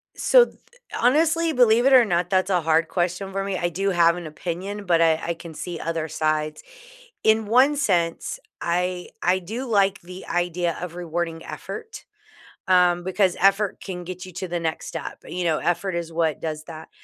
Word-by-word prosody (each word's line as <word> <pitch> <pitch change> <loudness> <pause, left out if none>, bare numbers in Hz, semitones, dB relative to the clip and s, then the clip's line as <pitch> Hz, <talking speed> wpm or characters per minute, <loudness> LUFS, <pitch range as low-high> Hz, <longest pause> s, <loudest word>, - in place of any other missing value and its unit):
So, - - +5 0.5
honestly, 320 +5 +3
believe 240 -1 +4
it 270 - +5
or 250 -3 +8
not, 175 -2 0
that's 185 0 +1
a 180 -2 +2
hard 160 +1 +2
question 180 +2 -2
for 195 0 -2
me. 195 -2 -2
I 175 - 0
do 195 +4 -1
have 170 -2 +4
an 175 -3 -6
opinion, 185 +6 -5
but 170 -2 +3
I 160 -1 +4
I 170 - 0
can 165 -1 -11
see 175 +1 -6
other 165 -1 -2
sides. 155 0 -1 0.6
In 220 0 +3
one 260 +6 +4
sense, 175 - 0 0.2
I 180 +1 -1
I 185 +2 +3
do 225 +9 -5
like 200 -3 +2
the 180 +2 -10
idea 175 -1 -1
of 180 -2 -5
rewarding 170 -1 -3
effort, 445 0 -8 0.6
um, 180 -1 +4
because 190 0 +1
effort 195 +2 +2
can 180 -2 -6
get 180 +1 -7
you 185 - -11
to 185 +2 -5
the 175 0 -2
next 160 -1 -3
step. - - -6
You 180 0 -3
know, 160 -2 +1
effort 175 +1 -1
is 170 -1 -4
what 160 -3 0
does 155 -1 -4
that. 160 -1 -10
180 Hz, 185 wpm, -23 LUFS, 170-195 Hz, 0.6 s, or